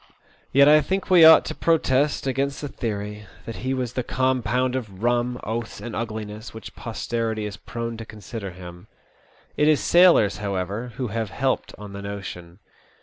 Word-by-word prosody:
Yet 140 Hz, +2 st, +6 dB
I 150 Hz, +1 st, +7 dB
think 190 Hz, +3 st, -2 dB
we 175 Hz, -3 st, +8 dB
ought 160 Hz, 0 st, +9 dB
to -, -, -4 dB
protest 150 Hz, -4 st, +1 dB
against 135 Hz, +1 st, -1 dB
the 145 Hz, -, -3 dB
theory 105 Hz, -4 st, -5 dB, 0.2 s
that 115 Hz, -, -6 dB
he 130 Hz, +2 st, -2 dB
was 125 Hz, -2 st, -3 dB
the 125 Hz, -, -1 dB
compound 130 Hz, 0 st, 0 dB
of 105 Hz, -6 st, -6 dB
rum, 120 Hz, +1 st, +1 dB
oaths, 110 Hz, 0 st, -4 dB
and 120 Hz, -, -6 dB
ugliness, 110 Hz, -1 st, -5 dB
which 110 Hz, -, -9 dB
posterity 115 Hz, -1 st, -3 dB
is 105 Hz, -1 st, -5 dB
prone 115 Hz, +2 st, -6 dB
to 115 Hz, -, -7 dB
consider 105 Hz, -1 st, -7 dB
him. 90 Hz, +1 st, -11 dB, 0.7 s
It 150 Hz, -, +3 dB
is 155 Hz, -2 st, +4 dB
sailors, 170 Hz, -, +5 dB
however, 100 Hz, +4 st, -3 dB
who 125 Hz, -2 st, -3 dB
have 110 Hz, 0 st, -3 dB
helped 130 Hz, +6 st, -1 dB
on 105 Hz, -1 st, -9 dB
the 100 Hz, -, -7 dB
notion. 95 Hz, -4 st, -7 dB
115 Hz, 170 wpm, -24 LUFS, 105-130 Hz, 0.7 s, ought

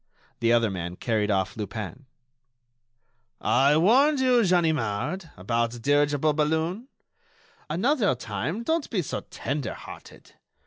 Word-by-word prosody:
The 115 Hz, -2 st, +2 dB
other 115 Hz, -3 st, +3 dB
man 90 Hz, -1 st, -5 dB
carried 110 Hz, 0 st, -1 dB
off 95 Hz, -2 st, 0 dB
Lupin. 110 Hz, +4 st, -6 dB, 1.3 s
"I 140 Hz, +3 st, +3 dB
warned 265 Hz, -, +4 dB
you, 250 Hz, -2 st, +4 dB
Ganimard... 165 Hz, -, 0 dB
about 115 Hz, +5 st, -1 dB
the 120 Hz, -, -8 dB
dirigible 145 Hz, +3 st, +2 dB
balloon. 160 Hz, -, -1 dB, 0.8 s
Another 205 Hz, -, +1 dB
time, 125 Hz, -, -4 dB
don't 320 Hz, +4 st, -1 dB
be 190 Hz, -7 st, -1 dB
so -, -, -3 dB
tender 135 Hz, -4 st, -4 dB
hearted. -, -, -12 dB
145 Hz, 120 wpm, -26 LUFS, 115-185 Hz, 1.3 s, warned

